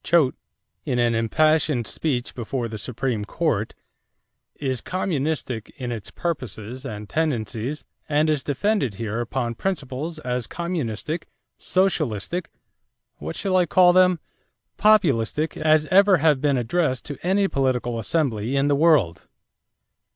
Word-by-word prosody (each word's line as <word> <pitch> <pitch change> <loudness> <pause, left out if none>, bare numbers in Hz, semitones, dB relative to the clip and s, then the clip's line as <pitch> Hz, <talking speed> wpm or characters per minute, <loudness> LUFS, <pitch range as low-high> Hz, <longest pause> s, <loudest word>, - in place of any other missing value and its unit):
Choate, 155 -6 +3 0.5
in 125 - -1
an 120 -1 +2
impassioned 150 +2 +2
speech 125 -1 -2
before 120 0 -3
the 110 -1 -7
Supreme 120 0 -2
Court, 110 -4 -1 0.8
"is 130 -4 -2
communistic 155 - -2
in 125 -3 -4
its 115 -4 -6
purposes 130 - -5
and 105 -3 -7
tendencies 130 -2 -2 0.2
and 150 +1 +3
is 150 -3 +1
defended 145 - 0
here 115 +2 -3
upon 120 0 -2
principles 150 0 -3
as 125 -5 -3
communistic, 160 -3 -3 0.3
socialistic 170 - 0 0.7
what - - -6
shall 190 -2 -1
I 180 -2 +4
call 180 +1 +5
them 180 -1 +5 0.6
populistic 155 - +3
as 155 0 +3
ever 195 0 +6
have 150 -4 +3
been 140 -2 +2
addressed 130 +2 0
to 145 - -6
any 195 +3 +2
political 125 -6 0
assembly 120 -2 -1
in 140 +1 +2
the 145 - +3
world." 140 - +3
140 Hz, 130 wpm, -23 LUFS, 120-165 Hz, 0.8 s, ever